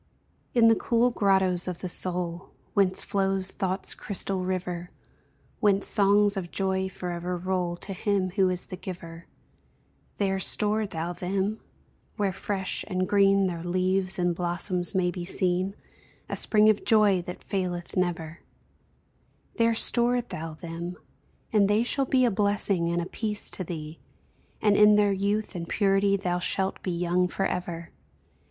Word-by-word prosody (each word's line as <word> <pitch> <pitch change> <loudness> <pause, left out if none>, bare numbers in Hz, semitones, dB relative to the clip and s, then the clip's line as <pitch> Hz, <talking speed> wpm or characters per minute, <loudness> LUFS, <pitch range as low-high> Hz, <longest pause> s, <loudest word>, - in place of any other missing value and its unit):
In 230 -1 +6
the 225 - +7
cool 235 +2 +1
grottos 190 -5 +1
of 180 -2 -5
the 185 - -3
soul, 175 -1 +1 0.2
Whence 190 -2 +1
flows 195 -1 -1
thought's 190 0 -2
crystal 195 -2 -3
river, 180 -1 -3 0.7
Whence 200 -2 +2
songs 205 0 +3
of 185 -3 -4
joy 190 0 -1
forever 180 -1 -4
roll 180 -1 -2
To 195 - -6
Him 190 -1 -1
who 190 -1 +2
is 180 -1 -4
the - - -7
Giver 170 -3 -9 0.9
There 195 -1 0
store 210 +2 +1
thou 170 0 -4
them, 195 +4 -2 0.6
where 200 -2 0
fresh 190 0 -3
and 185 -2 -1
green 195 -1 +4
Their 170 -3 -3
leaves 185 +1 +1
and 175 -1 +1
blossoms 175 +1 -1
may 180 -1 +1
be 175 -1 -6
seen, 185 +2 +1 0.5
A - - -4
spring 215 -1 +5
of 215 -1 +3
joy 210 -4 +4
that 180 0 -9
faileth 180 -3 -4
never; 170 -2 -2 1.2
There 230 0 +3
store 240 +2 +5
thou 165 -8 -7
them, 170 +2 -7 0.6
and 205 -2 +4
they 210 +3 +2
shall 270 +3 -1
be 255 -1 +3
A 240 - +2
blessing 200 -4 0
and 170 0 -1
a - - -5
peace 210 +2 -1
to 185 - -4
thee, 160 -2 -7 0.6
And 210 -1 +4
in 210 0 +6
their 205 -1 +3
youth 200 +2 -1
and 170 -2 -6
purity 200 0 +2
Thou 180 -2 -2
shalt 190 +1 -1
be - - -4
young 175 +1 0
forever! 175 -3 -3
190 Hz, 150 wpm, -26 LUFS, 175-200 Hz, 1.2 s, the